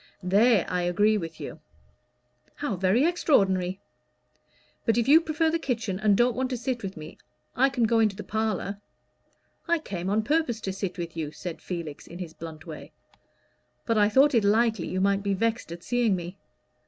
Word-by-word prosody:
"There 205 +3 +4
I 180 - -1
agree 205 +5 +2
with 165 -3 -7
you." 155 - -7 1.0
"How 290 -9 -2
very 190 - +2
extraordinary! 195 - +2 1.0
But 225 -1 +1
if 235 - +1
you 310 +4 +7
prefer 320 0 0
the 335 - 0
kitchen, 225 - -2
and 210 -2 +3
don't 240 0 +3
want 260 0 -1
to 255 - -2
sit 240 0 -3
with 195 -2 -6
me, 155 0 -10 0.4
I 270 +2 +4
can 255 -3 -1
go 225 0 +3
into 215 -3 +2
the - - -7
parlor." 215 -2 -2 0.9
"I 340 - +3
came 190 - -5
on 215 +2 +1
purpose 290 -4 0
to 190 - -3
sit 195 -1 -4
with 170 -2 -5
you," 155 -3 -3
said 175 +1 -7
Felix, 170 -5 -6
in 170 - -9
his 175 -3 -7
blunt 160 -2 -9
way, 160 -3 -9 0.9
"but 230 - +1
I 210 -1 +4
thought 275 +6 +5
it 230 -3 +3
likely 220 -2 +2
you 185 - -2
might 200 0 +2
be 200 -1 0
vexed 230 -1 -1
at 170 0 -8
seeing 240 -5 +1
me. 180 +2 -7
205 Hz, 190 wpm, -26 LUFS, 180-240 Hz, 1.0 s, you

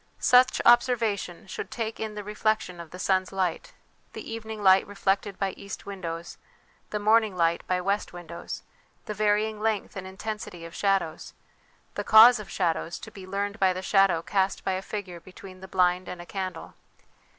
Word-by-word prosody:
Such 250 +1 +5
observation 230 -7 +3
should 190 - -6
take 225 -2 -4
in 215 -1 -4
the 210 - -5
reflection 210 -3 -1
of 170 -2 -9
the 180 - -10
sun's 185 0 +1
light, 185 -3 -2 0.4
the - - -8
evening 220 -2 -6
light 190 0 +6
reflected 200 0 -1
by 195 -1 -1
east 200 +1 -9
windows, 170 -4 -6 0.5
the 210 - -2
morning 215 -1 +3
light 170 0 +2
by 185 0 +1
west 200 +3 -1
windows; 170 -1 -8 0.4
the 210 - -4
varying 210 +1 +1
length 220 -2 -1
and 190 -1 -6
intensity 190 -3 -6
of 165 - -10
shadows, 195 -5 -1 0.6
the - - -3
cause 225 +2 +8
of 210 - -9
shadows, 170 -2 -1
to - - -10
be 190 -2 -11
learned 200 +2 -3
by 190 -1 +4
the 185 +1 -6
shadow 195 -4 +3
cast 195 0 0
by 190 - +1
a 185 0 -2
figure 195 -4 -6
between 185 +2 -13
the 190 - -9
blind 180 -1 +1
and 180 - -7
a 175 - -8
candle. 185 -2 -5
195 Hz, 175 wpm, -27 LUFS, 185-210 Hz, 0.6 s, cause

